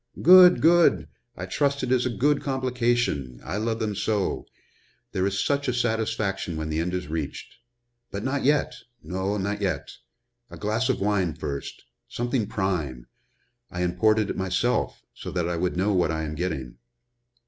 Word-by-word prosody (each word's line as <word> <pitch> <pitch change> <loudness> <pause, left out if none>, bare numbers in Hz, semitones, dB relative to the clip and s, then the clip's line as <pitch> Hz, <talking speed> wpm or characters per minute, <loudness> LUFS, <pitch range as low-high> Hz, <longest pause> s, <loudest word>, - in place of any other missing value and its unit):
"Good! 180 0 +8
good! 165 - +5 0.3
I 90 - -4
trust 140 +8 0
it 125 - -1
is 125 -1 +2
a - - -1
good 140 +6 +1
complication 120 - -1
I - - -4
love 110 +1 -1
them 110 -2 -2
so 100 0 -1 0.6
there 95 +1 0
is 100 0 -1
such 140 0 0
a 125 - 0
satisfaction 110 -7 -1
when 80 0 -3
the 80 0 -1
end 90 +2 -1
is 90 0 -4
reached. 75 -2 -5 0.5
But 100 +1 -5
not 135 +2 -1
yet 145 +1 +2 0.3
no, 95 +5 -2
not 100 +1 -2
yet. 95 -3 -2 0.6
A - - -10
glass 110 +5 -1
of 130 - 0
wine 95 -5 +1
first 70 -2 -6 0.3
something 120 -2 -1
prime 80 - -2 0.6
I 90 0 -3
imported 110 +4 +2
it - - -6
myself, 95 +6 -1
so - - -8
that 90 -2 0
I 85 - -1
would 90 +1 -1
know 100 +3 +1
what 90 -3 +2
I 80 0 -2
am 75 -1 -4
getting." 75 -8 -4
100 Hz, 170 wpm, -25 LUFS, 90-120 Hz, 0.6 s, Good